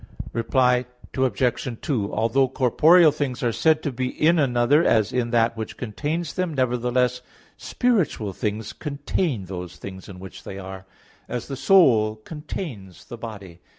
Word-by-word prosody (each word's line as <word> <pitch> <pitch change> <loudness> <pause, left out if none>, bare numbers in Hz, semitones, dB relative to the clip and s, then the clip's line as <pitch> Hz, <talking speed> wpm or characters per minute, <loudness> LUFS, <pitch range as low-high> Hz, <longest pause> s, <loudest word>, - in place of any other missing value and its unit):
Reply 125 +1 +2 0.3
Obj. 125 -1 0
2: 110 -8 -2
Although 115 +5 +2
corporeal 155 +6 +5
things 135 -4 -3
are 120 - +2
said 155 +6 +2
to 145 - -1
be 130 +1 -2
in 160 +6 +2
another 135 +3 +3
as 110 -7 +2
in 125 -2 0
that 115 -1 +2
which 110 -1 -6
contains 150 +9 -3
them, 180 -4 -2
nevertheless, 125 0 +1 0.3
spiritual 185 - 0
things 105 +2 -3
contain 140 - -2
those 90 -2 -7
things 95 -1 -9
in 95 -2 -10
which 95 0 -10
they 95 - -7
are; 95 0 -9 0.4
as 120 - -4
the 135 - -3
soul 125 - +4
contains 110 - -8
the 120 - -9
body. 100 -7 -9
125 Hz, 150 wpm, -23 LUFS, 110-145 Hz, 0.4 s, corporeal